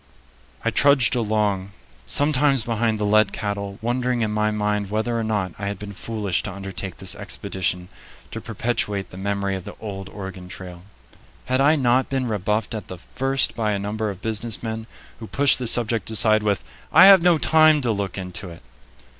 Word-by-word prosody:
I 115 - +2
trudged 135 -3 +4
along, 105 -4 -1 0.3
sometimes 140 - +3
behind 115 -1 0
the 105 - -1
led 110 +1 +3
cattle, 100 -1 -4
wondering 125 +1 0
in 110 -1 0
my 105 0 +1
mind 105 -1 -1
whether 110 +3 -1
or - - -1
not 105 -4 -1
I 100 - -3
had 100 -1 -3
been 100 +1 -8
foolish 105 -2 -2
to 105 - -5
undertake 95 -1 -6
this 95 -1 -1
expedition 95 -3 -3 0.4
to - - -6
perpetuate 105 -4 -3
the 90 - -10
memory 100 0 -2
of 95 - -6
the - - -9
old 95 -3 -7
Oregon 95 -2 -8
Trail. 90 -2 -9 0.6
Had 130 +1 +1
I 145 +3 +5
not 130 -2 +2
been 130 -2 -1
rebuffed 105 +2 -1
at 110 -4 -6
the 95 - -7
first 135 +8 -1
by 110 -2 0
a - - -1
number 105 +2 -3
of 100 -1 -8
business 110 0 0
men 110 0 -5 0.3
who 110 - -8
pushed 140 +2 +3
the 125 - -3
subject 115 -3 +2
aside 110 -1 +4
with, 105 -1 0 0.3
"I 160 +5 +8
have 195 -2 +9
no 175 -1 +4
time 155 0 +5
to 120 -3 0
look 100 -3 -3
into 95 +1 -5
it"? 85 - -13
105 Hz, 190 wpm, -22 LUFS, 100-120 Hz, 0.6 s, have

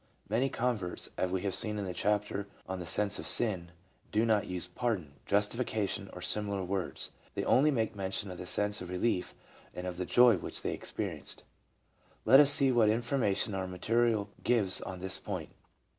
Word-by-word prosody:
Many 120 +6 +1
con 125 -1 0
verts, 90 -3 0
as 95 - -1
we 90 0 -2
have 100 -2 -1
seen 105 -2 -2
in 100 - -3
the 90 - -4
chapter 100 +1 -1 0.2
on 95 0 -4
the 90 - -6
sense 105 +3 +1
of - - -5
sin, 95 -7 +2 0.4
do 110 +2 +2
not 110 -3 +1
use 90 -1 -2
"pardon," 90 - -3
"justification," 105 -1 0
or 90 - -9
similar 100 -2 +1
words; 95 0 -3 0.2
they - - -2
only 145 +4 +4
make 115 -7 -1
mention 95 0 -3
of 90 - -9
the 90 - -6
sense 105 +1 +2
of 90 - -7
relief 90 0 -1 0.4
and 90 - -5
of 90 -1 -5
the 90 - -2
joy 120 -4 +6
which - - -2
they, - - -1
experienced. - - -4 0.8
Let 130 +5 +8
us 145 -1 +7
see 140 -2 +5
what 115 -4 +4
information 115 -2 0
our 95 -1 -3
material 110 +2 0
gives 110 -6 +3
on 95 -1 -7
this 95 0 +3
point. - - -5
105 Hz, 190 wpm, -31 LUFS, 95-115 Hz, 0.8 s, Let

